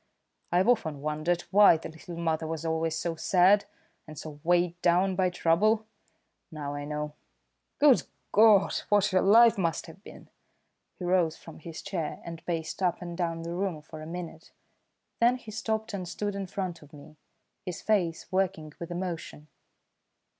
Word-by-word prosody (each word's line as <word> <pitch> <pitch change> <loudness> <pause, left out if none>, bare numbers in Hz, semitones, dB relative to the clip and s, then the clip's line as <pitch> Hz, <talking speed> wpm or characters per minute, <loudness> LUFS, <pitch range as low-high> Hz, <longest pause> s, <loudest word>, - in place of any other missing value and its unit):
I've 180 +4 +3
often 160 - +1
wondered 155 +4 -1
why 200 -4 +7
the 160 - -8
little 165 +2 -10
mother 160 -1 -1
was 160 0 -4
always 160 0 0
so 165 0 -2
sad, 185 +5 +4 0.4
and 155 -1 -10
so 150 -1 -8
weighed 175 0 +1
down 180 +2 +3
by 185 -1 +2
trouble. 205 +6 +2 0.7
Now 145 -2 -5
I 145 0 -5
know. 150 0 -4 0.6
Good 285 -4 +5 0.3
God, 210 -2 +6 0.2
what 205 -1 +4
her 185 -2 +3
life 225 +1 +6
must 165 -3 -1
have 170 +3 -13
been!" - - -13 0.7
He 180 - -6
rose 175 -3 +2
from 165 - -12
his 160 0 -9
chair 180 -6 -4
and 165 -1 -8
paced 165 +1 -3
up 180 -2 +1
and 175 -1 -7
down 165 -2 -2
the 170 +1 -5
room 175 -4 -3
for 155 0 -10
a 155 - -8
minute; 170 -1 -8 0.7
then 240 +2 +4
he 240 -4 -10
stopped 220 0 -3
and 185 -3 -4
stood 205 +3 -3
in 195 -1 -4
front 180 -2 -4
of 150 0 -17
me, 150 +1 -14 0.5
his 180 - -6
face 180 -7 +1
working 185 -5 -1
with 170 - -6
emotion. 175 -4 -5
175 Hz, 170 wpm, -28 LUFS, 160-195 Hz, 0.7 s, why